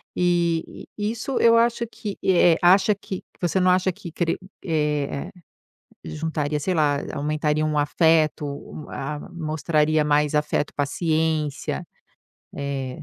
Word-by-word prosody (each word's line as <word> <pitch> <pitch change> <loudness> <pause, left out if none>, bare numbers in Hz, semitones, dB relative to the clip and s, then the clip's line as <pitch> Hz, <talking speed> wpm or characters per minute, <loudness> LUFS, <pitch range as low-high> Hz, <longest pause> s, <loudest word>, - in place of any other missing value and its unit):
e, 170 -2 0
e 210 0 -1
isso 240 +4 -3
eu 230 0 +6
acho 235 0 +2
que, 205 -3 -6
eh, 175 -3 +5
acha 190 +4 +5
que, 190 -1 -7
que - - -35
você 175 +1 +1
não 185 0 +3
acha 185 +1 +2
que, 170 -1 -10 0.5
eh, 150 -1 -1 0.8
juntaria, 150 -1 -2
sei 185 +5 -1
lá, 145 -3 +2 0.2
aumentariam 150 +1 0
o 150 - 0
afeto, 155 +1 +2
o-a-mostraria 155 +2 -2
mais 150 0 +2
afeto, 150 -1 0
paciência 155 0 -1 0.7
eh 135 -2 -4
155 Hz, 120 wpm, -23 LUFS, 150-175 Hz, 0.8 s, eu